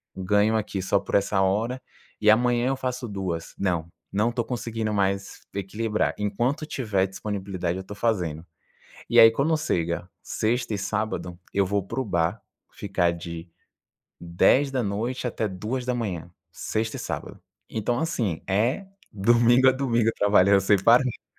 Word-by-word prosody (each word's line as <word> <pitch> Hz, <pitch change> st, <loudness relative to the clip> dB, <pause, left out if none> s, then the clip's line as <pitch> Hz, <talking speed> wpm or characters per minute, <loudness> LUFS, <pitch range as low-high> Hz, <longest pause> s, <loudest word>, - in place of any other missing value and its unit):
ganho 105 Hz, +3 st, +2 dB
aqui 100 Hz, -3 st, -3 dB
só -, -, +2 dB
por -, -, -4 dB
essa 100 Hz, 0 st, +2 dB
hora 110 Hz, +7 st, 0 dB, 0.4 s
e 105 Hz, -, +3 dB
amanhã 120 Hz, +2 st, +4 dB
eu 135 Hz, -, +1 dB
faço 125 Hz, -2 st, -4 dB
2." 95 Hz, -5 st, -4 dB
Não, 85 Hz, -4 st, -1 dB, 0.3 s
não 110 Hz, +4 st, +2 dB
estou 120 Hz, -1 st, -2 dB
conseguindo 115 Hz, -3 st, -3 dB
mais 100 Hz, -1 st, -1 dB
equilibrar. 105 Hz, +3 st, -1 dB
Enquanto 120 Hz, +8 st, -1 dB
tiver 105 Hz, -10 st, 0 dB
disponibilidade, 95 Hz, -3 st, -4 dB
eu -, -, -4 dB
estou 100 Hz, +2 st, -9 dB
fazendo. 90 Hz, -9 st, -1 dB, 0.6 s
E -, -, +2 dB
aí, 115 Hz, 0 st, +10 dB
quando 150 Hz, +7 st, +1 dB
chega 85 Hz, -, -2 dB
sexta 115 Hz, 0 st, -1 dB
e -, -, -1 dB
sábado, 100 Hz, -3 st, -3 dB
eu 100 Hz, -1 st, +2 dB
vou 100 Hz, +1 st, 0 dB
para 130 Hz, +7 st, -3 dB
o -, -, -4 dB
bar 90 Hz, +2 st, 0 dB, 0.3 s
ficar 90 Hz, -4 st, 0 dB
de 85 Hz, 0 st, -7 dB, 0.7 s
10 90 Hz, +11 st, +3 dB
da 130 Hz, -2 st, 0 dB
noite 115 Hz, +6 st, -2 dB
até 110 Hz, -1 st, -2 dB
2 110 Hz, +7 st, -4 dB
da 125 Hz, -, 0 dB
manhã, 95 Hz, -8 st, -3 dB, 0.2 s
sexta 110 Hz, 0 st, -3 dB
e -, -, -6 dB
sábado. -, -, -6 dB, 0.3 s
Então, 120 Hz, +3 st, -1 dB
assim, 115 Hz, -, -1 dB
é, 115 Hz, -, +1 dB, 0.3 s
domingo 120 Hz, +5 st, +4 dB
a -, -, +6 dB
domingo, 120 Hz, -4 st, +1 dB
trabalhando 100 Hz, -1 st, +5 dB
sem 95 Hz, 0 st, +3 dB
parar. 120 Hz, +2 st, +3 dB
105 Hz, 155 wpm, -25 LUFS, 95-120 Hz, 0.7 s, aí